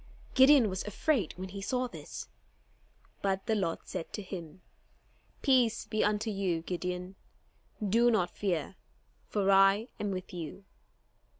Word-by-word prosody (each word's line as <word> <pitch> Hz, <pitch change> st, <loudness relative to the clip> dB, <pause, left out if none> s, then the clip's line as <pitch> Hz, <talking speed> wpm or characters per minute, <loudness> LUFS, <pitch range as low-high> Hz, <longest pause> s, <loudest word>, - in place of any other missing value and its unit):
Gideon 265 Hz, -2 st, +7 dB
was 190 Hz, -1 st, -2 dB
afraid 210 Hz, -, 0 dB
when 185 Hz, +1 st, -6 dB
he 200 Hz, +1 st, -7 dB
saw 250 Hz, +5 st, 0 dB
this; -, -, -8 dB, 0.9 s
but 195 Hz, -1 st, 0 dB
the 225 Hz, -, +1 dB
Lord 190 Hz, -6 st, -1 dB
said 165 Hz, -, -6 dB
to 210 Hz, -, -4 dB
him: 180 Hz, -2 st, -8 dB, 0.8 s
"Peace 250 Hz, -5 st, +3 dB
be 215 Hz, -, 0 dB
unto 210 Hz, +1 st, +1 dB
you, 185 Hz, -5 st, -1 dB
Gideon, 180 Hz, +1 st, -4 dB, 0.7 s
do 235 Hz, +4 st, +4 dB
not 215 Hz, -7 st, +1 dB
fear, 185 Hz, -3 st, -2 dB, 0.5 s
for 200 Hz, -2 st, +1 dB
I 195 Hz, +4 st, +5 dB
am 205 Hz, -, -1 dB
with 185 Hz, -1 st, -5 dB
you." 175 Hz, +2 st, -6 dB
195 Hz, 135 wpm, -31 LUFS, 185-220 Hz, 0.9 s, Gideon